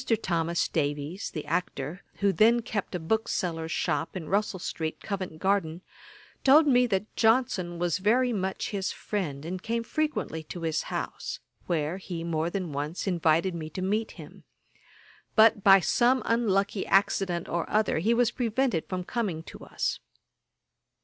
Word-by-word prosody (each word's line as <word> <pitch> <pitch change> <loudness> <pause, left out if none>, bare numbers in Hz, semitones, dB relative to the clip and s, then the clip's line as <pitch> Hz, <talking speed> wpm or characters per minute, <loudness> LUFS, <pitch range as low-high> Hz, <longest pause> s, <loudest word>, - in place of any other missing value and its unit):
Thomas 170 -1 0
Davies 150 +4 -2
the 155 - -6
actor, 165 0 -3 0.2
who 200 -1 +3
then 230 +6 +4
kept 205 -5 -3
a - - -1
bookseller's 165 -3 -1
shop 165 +3 -1
in 165 -4 -7
Russel 200 0 0
street, 160 -3 -4
Covent 185 -6 -5
garden, 185 -2 0 0.6
told 295 +4 +7
me 250 -3 +4
that 200 0 -2
Johnson 220 -7 +2
was 175 +2 0
very 240 +5 +3
much 190 -2 -2
his 195 -2 -2
friend, 155 -9 -4
and 180 +2 -4
came 230 +2 -2
frequently 300 - -2
to 170 +2 -8
his 160 -1 0
house, - - -4 0.3
where 160 0 -1
he 180 -3 -6
more 165 -1 -1
than 180 -3 -3
once 145 +4 -3
invited 170 -1 +2
me 160 -2 -5
to 185 +4 -5
meet 215 +4 -1
him; - - -12 0.9
but 220 -2 +6
by 195 -1 +8
some 245 +7 +2
unlucky 205 -4 +1
accident 190 -3 +2
or 170 0 -2
other 210 -6 +2
he 225 +8 +2
was 240 -1 +3
prevented 235 - 0
from 185 -1 -2
coming 185 -7 -2
to - - -11
us. - - -2
185 Hz, 155 wpm, -28 LUFS, 165-220 Hz, 0.9 s, by